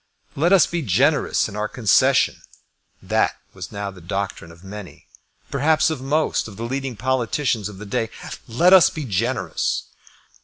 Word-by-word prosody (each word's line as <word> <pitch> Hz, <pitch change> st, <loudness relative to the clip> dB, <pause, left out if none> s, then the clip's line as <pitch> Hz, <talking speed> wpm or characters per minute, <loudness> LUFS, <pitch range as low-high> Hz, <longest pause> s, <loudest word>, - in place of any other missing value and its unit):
Let 165 Hz, +6 st, +2 dB
us 195 Hz, -3 st, +6 dB
be 170 Hz, -1 st, -3 dB
generous 140 Hz, -, +2 dB
in 105 Hz, -, -9 dB
our 105 Hz, 0 st, -1 dB
concession. 110 Hz, -4 st, +2 dB, 0.6 s
That -, -, +1 dB, 0.2 s
was -, -, -8 dB
now 100 Hz, -1 st, -4 dB
the 90 Hz, -2 st, -14 dB
doctrine 95 Hz, -1 st, -4 dB
of 85 Hz, +2 st, -17 dB
many, 100 Hz, -1 st, -10 dB, 0.5 s
perhaps 155 Hz, +3 st, +2 dB
of 150 Hz, -5 st, -4 dB
most 150 Hz, +1 st, 0 dB
of 105 Hz, -2 st, -11 dB
the 115 Hz, -, -5 dB
leading 135 Hz, 0 st, -3 dB
politicians 125 Hz, -2 st, -1 dB
of 100 Hz, -, -11 dB
the 105 Hz, -, -9 dB
day. 115 Hz, +2 st, -2 dB, 0.4 s
Let 170 Hz, +11 st, +4 dB
us 185 Hz, -3 st, +8 dB
be 155 Hz, -3 st, -6 dB
generous. 115 Hz, +4 st, -1 dB
120 Hz, 160 wpm, -22 LUFS, 100-145 Hz, 0.6 s, us